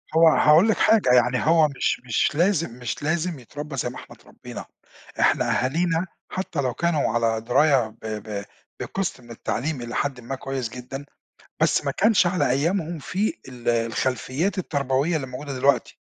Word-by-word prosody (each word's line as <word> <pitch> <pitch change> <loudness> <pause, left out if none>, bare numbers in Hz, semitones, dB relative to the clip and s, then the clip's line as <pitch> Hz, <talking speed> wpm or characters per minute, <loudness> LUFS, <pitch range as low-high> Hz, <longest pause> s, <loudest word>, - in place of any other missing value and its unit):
هو 165 0 +7
هاقول 160 +5 +5
لِك 220 - +2
حاجة، 220 - +4
يعني 125 0 +4
هو 160 0 +5
مش 140 -2 -1
مش 125 +4 +1
لازم 170 - +1
مش 125 +2 -4
لازم 165 +1 -1
يتربى 145 +4 -8
زي 125 - -1
ما 125 - -10
إحنا - - -11
اتربينا، - - -10 0.5
إحنا - - +3
أهالينا 165 +6 +1 0.3
حتى 185 -5 -2
لو 130 -3 -1
كانوا 170 -1 +1
على 115 -1 +1
دراية 130 +1 +3
ب - - -11
ب 105 -2 -5 0.3
بقسط 190 -8 -3
من 120 -1 -14
التعليم 130 +5 -3
إلي 120 0 -6
حدٍ 140 -3 -1
ما 125 +3 -5
كويس 135 -2 -4
جدًا، 125 +3 -8 0.6
بس - - +2
ما - - +1
كانش 205 -3 +3
على 175 -6 +1
أيامهم 165 +5 0
في 190 +9 -1 0.2
ال 120 -2 -4
الخلفيات 130 - -1
التربوية 140 -1 0
اللي 140 -4 -2
موجودة 135 +3 -6
دلوقتي، 135 +2 +1
140 Hz, 165 wpm, -24 LUFS, 125-165 Hz, 0.6 s, هو